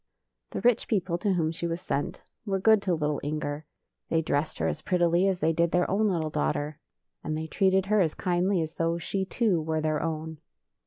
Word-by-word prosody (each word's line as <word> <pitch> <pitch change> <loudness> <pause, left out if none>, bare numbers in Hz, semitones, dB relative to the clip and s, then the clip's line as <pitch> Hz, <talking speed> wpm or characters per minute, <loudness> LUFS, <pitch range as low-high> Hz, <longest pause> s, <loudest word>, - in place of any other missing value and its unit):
The - - -4
rich 245 -2 +3
people, 185 -5 0
to 200 +1 +1
whom 160 -3 +1
she 170 +1 -3
was 165 +1 -2
sent, 145 -5 -3 0.2
were 195 -3 -1
good 220 +1 +5
to 185 -3 +1
little 150 -2 -1
Inger. 150 0 -3 0.4
They 165 0 +1
dressed 145 0 -1
her - - 0
as 155 - -2
prettily 175 +2 +2
as 190 -2 0
they 160 +1 +3
did 170 +1 +2
their 180 +1 +2
own 210 +3 +2
little 165 -5 -1
daugh 75 - +1
ter, 150 +1 -4 0.4
and 155 0 -2
they 160 - -3
treated 190 +3 +2
her 210 +1 +3
as 160 -4 +1
kindly 180 0 +1
as 160 0 -6
though 165 0 0
she, 190 +3 -2
too, 195 -5 +1
were 160 0 -1
their 155 -1 0
own. 160 -1 -4
170 Hz, 215 wpm, -27 LUFS, 155-190 Hz, 0.4 s, good